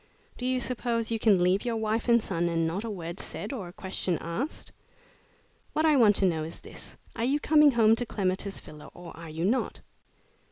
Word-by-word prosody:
Do 250 Hz, -, -4 dB
you 255 Hz, 0 st, +1 dB
suppose 235 Hz, -2 st, -1 dB
you 225 Hz, -, 0 dB
can 200 Hz, -5 st, +4 dB
leave 185 Hz, +3 st, +2 dB
your 235 Hz, -2 st, -1 dB
wife 220 Hz, +2 st, -1 dB
and 235 Hz, -1 st, +5 dB
son 170 Hz, -2 st, -1 dB
and 165 Hz, -1 st, 0 dB
not 175 Hz, +6 st, -2 dB
a 230 Hz, -, -4 dB
word 175 Hz, -3 st, -6 dB
said 210 Hz, +6 st, -5 dB
or 205 Hz, -9 st, -5 dB
a -, -, -9 dB
question 185 Hz, -2 st, -2 dB
asked? 200 Hz, -, -4 dB, 1.0 s
What 310 Hz, -, +1 dB
I 310 Hz, -2 st, +5 dB
want 220 Hz, -6 st, +5 dB
to 195 Hz, -, +2 dB
know 160 Hz, -4 st, +1 dB
is 160 Hz, +2 st, -7 dB
this -, -, -12 dB, 0.2 s
are 230 Hz, -, -2 dB
you 275 Hz, +4 st, +2 dB
coming 300 Hz, 0 st, +5 dB
home 225 Hz, -4 st, +5 dB
to 245 Hz, -, -1 dB
Clematis 195 Hz, -1 st, -2 dB
Villa 150 Hz, -1 st, -12 dB
or 175 Hz, -1 st, -10 dB
are 165 Hz, 0 st, -9 dB
you 160 Hz, +2 st, -3 dB
not?" 235 Hz, +7 st, 0 dB
210 Hz, 210 wpm, -28 LUFS, 175-240 Hz, 1.0 s, and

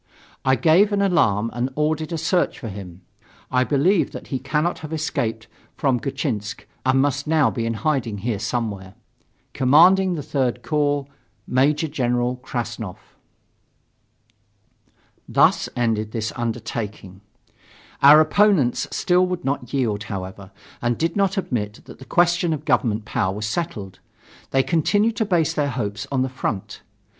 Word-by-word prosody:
I 130 Hz, 0 st, +3 dB
gave 175 Hz, +8 st, +4 dB
an 200 Hz, -1 st, +1 dB
alarm 115 Hz, -, +2 dB
and 120 Hz, +2 st, -1 dB
ordered 155 Hz, +1 st, -1 dB
a 165 Hz, -, -2 dB
search 175 Hz, +3 st, 0 dB
for 115 Hz, -, -6 dB
him. 95 Hz, -3 st, -9 dB, 0.5 s
I 125 Hz, 0 st, +3 dB
believe 155 Hz, +8 st, +2 dB
that -, -, -9 dB
he 130 Hz, -, -2 dB
cannot 150 Hz, +6 st, -1 dB
have 155 Hz, -1 st, -8 dB
escaped 115 Hz, -8 st, -2 dB, 0.3 s
from 130 Hz, -4 st, +1 dB
Gatchinsk 120 Hz, -7 st, -3 dB, 0.2 s
and 130 Hz, 0 st, +3 dB
must 140 Hz, +1 st, 0 dB
now 155 Hz, -3 st, +3 dB
be 115 Hz, -2 st, -2 dB
in 115 Hz, -, -1 dB
hiding 120 Hz, -5 st, -1 dB
here 115 Hz, -5 st, -1 dB
somewhere. 105 Hz, -4 st, -3 dB, 0.6 s
Commanding 180 Hz, +8 st, +5 dB
the 150 Hz, -, -4 dB
3rd 135 Hz, -4 st, -1 dB
Corps, 145 Hz, -2 st, 0 dB, 0.4 s
Major 145 Hz, +5 st, +2 dB
General 125 Hz, -3 st, 0 dB
Krassnov. 115 Hz, -6 st, -5 dB, 2.3 s
Thus -, -, +3 dB
ended 110 Hz, -3 st, -1 dB
this 110 Hz, -1 st, -3 dB
undertaking. 110 Hz, -5 st, -5 dB, 0.8 s
Our 145 Hz, +2 st, +9 dB
opponents 165 Hz, -, +3 dB
still 180 Hz, 0 st, +2 dB
would 180 Hz, -1 st, -4 dB
not 135 Hz, -3 st, -2 dB
yield, 110 Hz, -7 st, -1 dB
however, 95 Hz, -1 st, -7 dB, 0.3 s
and 120 Hz, 0 st, 0 dB
did 165 Hz, +1 st, -1 dB
not 195 Hz, -1 st, +1 dB
admit 110 Hz, -, -3 dB
that -, -, -13 dB
the 130 Hz, -, -11 dB
question 175 Hz, +1 st, +2 dB
of 150 Hz, 0 st, -5 dB
government 110 Hz, -3 st, +1 dB
power 95 Hz, -1 st, -1 dB
was 105 Hz, +1 st, -3 dB
settled. 110 Hz, -, -4 dB, 0.5 s
They 135 Hz, 0 st, +2 dB
continued 205 Hz, +8 st, +1 dB
to 220 Hz, -, +1 dB
base 170 Hz, -6 st, +1 dB
their 145 Hz, -1 st, 0 dB
hopes 105 Hz, -5 st, -4 dB
on 130 Hz, -2 st, +1 dB
the -, -, -1 dB
front. 120 Hz, -6 st, -4 dB
130 Hz, 145 wpm, -22 LUFS, 110-155 Hz, 2.3 s, Our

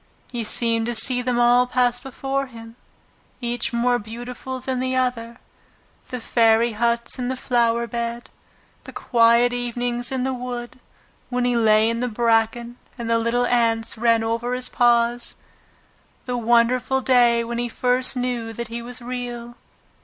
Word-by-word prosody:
He 240 Hz, -2 st, -3 dB
seemed 230 Hz, +1 st, +1 dB
to 240 Hz, -, -1 dB
see 250 Hz, +2 st, +6 dB
them 245 Hz, -1 st, -1 dB
all 245 Hz, +1 st, +4 dB
pass 245 Hz, -1 st, +1 dB
before 270 Hz, +1 st, -4 dB
him, 230 Hz, -2 st, -12 dB, 0.6 s
each 240 Hz, -1 st, -2 dB
more 245 Hz, +1 st, +1 dB
beautiful 245 Hz, +4 st, -7 dB
than 260 Hz, 0 st, -3 dB
the 260 Hz, 0 st, -1 dB
other, 240 Hz, -2 st, -2 dB, 0.7 s
the 250 Hz, -, -4 dB
fairy 230 Hz, 0 st, +2 dB
huts 235 Hz, +3 st, -1 dB
in 245 Hz, -, -2 dB
the 260 Hz, -, -2 dB
flower 235 Hz, -2 st, 0 dB
bed, 235 Hz, +1 st, -5 dB, 0.5 s
the -, -, -10 dB
quiet 235 Hz, +1 st, +3 dB
evenings 245 Hz, 0 st, -3 dB
in 260 Hz, -1 st, -1 dB
the 265 Hz, 0 st, -1 dB
wood 245 Hz, -1 st, -6 dB, 0.5 s
when 245 Hz, 0 st, -1 dB
he 245 Hz, -1 st, +1 dB
lay 220 Hz, -1 st, +4 dB
in 230 Hz, 0 st, -1 dB
the 250 Hz, -, -1 dB
bracken 235 Hz, +1 st, 0 dB, 0.2 s
and 230 Hz, -1 st, -4 dB
the 230 Hz, -, +3 dB
little 235 Hz, +2 st, 0 dB
ants 230 Hz, -2 st, 0 dB
ran 230 Hz, 0 st, +2 dB
over 230 Hz, +2 st, -2 dB
his 250 Hz, 0 st, -2 dB
paws; 240 Hz, 0 st, +1 dB, 0.9 s
the 250 Hz, -, -3 dB
wonderful 240 Hz, +3 st, +2 dB
day 240 Hz, -2 st, +3 dB
when 235 Hz, +1 st, -4 dB
he 240 Hz, 0 st, -2 dB
first 250 Hz, +2 st, +3 dB
knew 245 Hz, -2 st, -3 dB
that 235 Hz, 0 st, -6 dB
he 235 Hz, +1 st, -5 dB
was 245 Hz, +1 st, -5 dB
Real. 240 Hz, -1 st, -6 dB
240 Hz, 160 wpm, -22 LUFS, 235-250 Hz, 0.9 s, see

